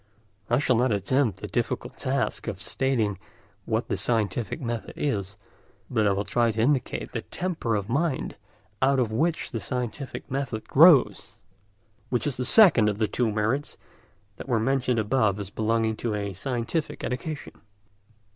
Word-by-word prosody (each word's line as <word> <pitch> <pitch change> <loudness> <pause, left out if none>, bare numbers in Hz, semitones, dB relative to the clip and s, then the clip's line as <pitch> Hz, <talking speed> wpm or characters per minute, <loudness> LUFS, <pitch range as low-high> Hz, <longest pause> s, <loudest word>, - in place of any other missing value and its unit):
I 120 - +3
shall 130 -3 +2
not 125 +1 +2
attempt 110 +3 0
the - - -4
difficult - - -2
task - - -2
of - - -4
stating 110 -8 -1 0.5
what 110 +1 -1
the - - -1
scientific 115 - -1
method 120 -5 -4
is, 100 -7 -2 0.5
but 110 -4 +2
I - - +3
will 100 +1 0
try 120 +2 +1
to 110 0 -3
indicate 130 +2 0
the - - -3
temper 165 -11 -2
of 100 -1 -2
mind 140 +4 -1 0.5
out 135 +1 +3
of 120 -4 +1
which 160 +9 0
the 115 - -3
scientific 125 +6 -4
method 130 -5 -3
grows, 155 -1 +5 0.7
which 125 - 0
is 145 -4 -2
the 125 - -2
second 130 - +6
of 105 - -2
the 110 0 +1
two 120 +1 0
merits 110 +7 -1 0.6
that - - -9
were 120 -3 +2
mentioned 125 +1 +1
above 110 -2 +1
as 100 -1 -6
belonging 110 +1 0
to 115 -3 -2
a 100 -1 -3
scientific 125 - -3
education. 145 +5 -5
120 Hz, 160 wpm, -26 LUFS, 110-135 Hz, 0.7 s, second